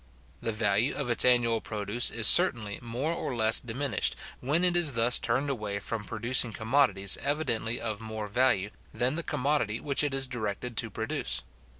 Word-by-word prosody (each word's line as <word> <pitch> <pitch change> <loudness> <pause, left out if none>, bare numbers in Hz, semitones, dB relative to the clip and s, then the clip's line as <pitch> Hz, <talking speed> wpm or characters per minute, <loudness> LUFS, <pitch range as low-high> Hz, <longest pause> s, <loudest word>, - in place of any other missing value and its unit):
The 115 - -2
value 105 +2 0
of 140 -5 -3
its 120 - +4
annual 120 -2 +2
produce 105 +2 0
is 115 -2 -1
certainly 120 - +6
more 120 +7 -3
or 140 -6 -5
less 110 -1 +4
diminished, 130 +4 -2 0.2
when 150 +7 0
it 180 -1 +2
is 165 -5 +4
thus 115 +1 +4
turned 130 +5 -1
away 105 -7 -4
from 105 +1 -5
producing 120 +1 +1
commodities 110 -5 +1
evidently 125 -6 -2
of 110 -2 -5
more 110 -1 -6
value 105 -3 0 0.2
than 125 +2 0
the 165 - -2
commodity 140 -8 -2
which 140 0 -1
it 145 -2 -2
is 135 0 +1
directed 120 -1 -5
to - - 0
produce. - - -3
120 Hz, 175 wpm, -28 LUFS, 110-140 Hz, 0.2 s, certainly